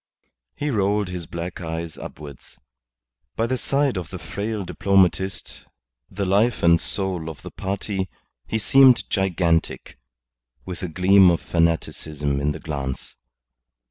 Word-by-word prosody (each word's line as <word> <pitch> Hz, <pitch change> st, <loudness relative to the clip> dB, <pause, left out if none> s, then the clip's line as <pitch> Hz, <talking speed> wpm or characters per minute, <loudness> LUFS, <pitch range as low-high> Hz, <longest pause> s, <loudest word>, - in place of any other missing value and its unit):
He 145 Hz, 0 st, -2 dB
rolled 100 Hz, -2 st, +1 dB
his 90 Hz, -3 st, -6 dB
black 85 Hz, +1 st, -6 dB
eyes 80 Hz, -1 st, -4 dB
upwards. 70 Hz, -3 st, -11 dB, 0.8 s
By 115 Hz, -, +1 dB
the 130 Hz, +2 st, 0 dB
side 140 Hz, -2 st, 0 dB
of 85 Hz, -, -8 dB
the -, -, -6 dB
frail 105 Hz, -1 st, -4 dB
diplomatist 95 Hz, 0 st, 0 dB, 0.4 s
the 100 Hz, +1 st, -3 dB
life 105 Hz, +5 st, +2 dB
and 85 Hz, 0 st, +5 dB
soul 95 Hz, -5 st, -3 dB
of 70 Hz, -4 st, -10 dB
the -, -, -8 dB
party 95 Hz, -1 st, -3 dB, 0.4 s
he 110 Hz, -, -1 dB
seemed 130 Hz, +3 st, +5 dB
gigantic, 90 Hz, -, 0 dB, 0.7 s
with 90 Hz, -2 st, -7 dB
a 90 Hz, -, -2 dB
gleam 95 Hz, +3 st, +5 dB
of 85 Hz, -, +2 dB
fanaticism 80 Hz, -4 st, -1 dB
in 75 Hz, +1 st, +1 dB
the -, -, -6 dB
glance. 70 Hz, -4 st, -5 dB
95 Hz, 135 wpm, -23 LUFS, 80-100 Hz, 0.8 s, and